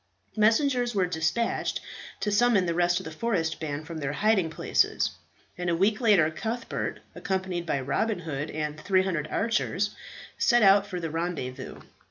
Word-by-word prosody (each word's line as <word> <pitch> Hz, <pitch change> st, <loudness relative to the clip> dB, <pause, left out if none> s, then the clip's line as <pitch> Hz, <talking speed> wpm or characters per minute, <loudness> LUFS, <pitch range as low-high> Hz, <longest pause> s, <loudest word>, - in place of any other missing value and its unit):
Messengers 240 Hz, +2 st, +2 dB
were 190 Hz, -2 st, +3 dB
despatched 180 Hz, +7 st, -1 dB, 0.4 s
to 210 Hz, -, 0 dB
summon 205 Hz, -2 st, +4 dB
the 170 Hz, -, 0 dB
rest 175 Hz, +1 st, +2 dB
of -, -, -8 dB
the 160 Hz, -, -7 dB
forest 165 Hz, -3 st, -1 dB
band 150 Hz, -1 st, -4 dB
from 165 Hz, -1 st, -6 dB
their 145 Hz, -1 st, -2 dB
hiding 195 Hz, 0 st, +2 dB
places, 160 Hz, -, +1 dB, 0.5 s
and 180 Hz, -1 st, -1 dB
a 170 Hz, -, +2 dB
week 205 Hz, +6 st, +2 dB
later 195 Hz, -9 st, +4 dB
Cuthbert, 230 Hz, +8 st, -4 dB
accompanied 185 Hz, -3 st, -3 dB
by 140 Hz, -, 0 dB
Robin 205 Hz, -, 0 dB
Hood 150 Hz, -2 st, -4 dB
and 150 Hz, 0 st, -4 dB
300 185 Hz, -5 st, +1 dB
archers, 210 Hz, -1 st, 0 dB, 0.5 s
set 240 Hz, -2 st, +4 dB
out 195 Hz, 0 st, +6 dB
for 180 Hz, -2 st, -4 dB
the 165 Hz, -2 st, -4 dB
rendezvous. 150 Hz, -6 st, -4 dB
180 Hz, 160 wpm, -27 LUFS, 160-215 Hz, 0.5 s, out